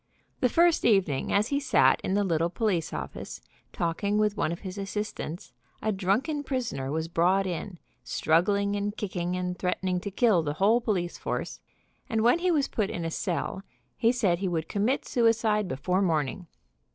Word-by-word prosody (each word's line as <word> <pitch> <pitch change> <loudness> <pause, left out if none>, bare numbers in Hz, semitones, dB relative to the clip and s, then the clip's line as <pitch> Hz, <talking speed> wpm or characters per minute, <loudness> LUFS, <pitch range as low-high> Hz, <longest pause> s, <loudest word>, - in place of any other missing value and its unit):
The 250 - +3
first 340 +4 +3
evening, 185 - +2
as 210 +4 +2
he 280 - +1
sat 280 - +3
in 190 - -1
the 205 - +2
little 170 -3 +1
police 185 -4 -1
office, - - -6 0.3
talking 190 +5 -1
with 210 -1 +2
one 200 - 0
of 170 - -5
his 190 +1 -6
assistants, 200 -3 -5 0.3
a 215 - 0
drunken 210 - 0
prisoner 240 - -3
was 160 +1 -2
brought 180 +4 +2
in, 180 +1 -4 0.3
struggling 200 +5 +1
and 205 +1 -2
kicking, 180 -3 -2
and 180 0 -3
threatening 180 0 -1
to 200 - -5
kill 200 -3 +3
the 145 -2 -2
whole 210 +9 +3
police 185 -7 -2
force, - - -4 0.5
arid 220 -1 +1
when 240 +8 +4
he 365 +1 +1
was 300 -5 +2
put 210 -3 -1
in 170 - -4
a 165 - -2
cell 180 +2 -2 0.3
he 230 - +3
said 200 -9 +1
he 195 - -1
would 165 -3 -2
commit 220 +7 0
suicide 225 -4 +2
before 180 +5 0
morning. 165 -1 0
195 Hz, 175 wpm, -27 LUFS, 175-220 Hz, 0.5 s, when